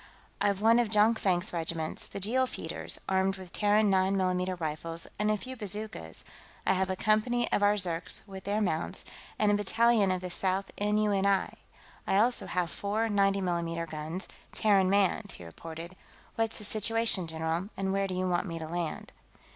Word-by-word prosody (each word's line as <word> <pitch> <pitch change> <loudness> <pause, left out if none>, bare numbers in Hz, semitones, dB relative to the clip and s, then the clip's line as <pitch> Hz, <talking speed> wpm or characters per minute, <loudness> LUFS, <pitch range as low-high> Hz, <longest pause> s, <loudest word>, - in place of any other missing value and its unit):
"I've 200 -1 +1
one 230 +2 +5
of 235 -3 +1
Jonkvank's 210 -5 +2
regiments, 160 -1 -3
the - - -7
Jeel 250 +7 +1
Feeders, - - -4
armed 190 0 +1
with 185 -2 -11
Terran 210 0 +3
9 190 +1 +2
mm 185 -1 0
rifles 165 +1 -4
and 210 0 +1
a 215 - +2
few 255 +6 -8
bazookas; 205 - -4 0.4
I - - +4
have 190 0 0
a 190 - 0
company 215 +4 +1
of - - +2
our 205 0 +4
Zirks, 175 0 +2
with 190 -1 -9
their 205 +2 0
mounts, 165 -5 -2 0.3
and 210 -1 +3
a - - +3
battalion 210 +1 +3
of 185 -1 0
the 180 -1 -5
Sixth 190 +2 -1
N.U.N.I.; 205 -2 +1 0.5
I 195 - +2
also 240 +4 +2
have 175 -2 -1
four 215 +3 -1
90 200 -1 +2
mm 170 -2 -2
guns, 160 +4 +1 0.2
Terran 195 -3 +3
manned," 200 +1 +1
he 85 - -10
reported. 165 - -9 0.4
"What's 225 0 -1
the 210 - -7
situation, 215 -3 +2
general, 160 +4 -2
and 190 0 -1
where 195 0 +1
do 185 - -4
you 185 0 -1
want 180 +2 0
me 165 -1 -4
to 160 -1 -6
land?" 170 -1 -4
195 Hz, 180 wpm, -29 LUFS, 175-210 Hz, 0.5 s, one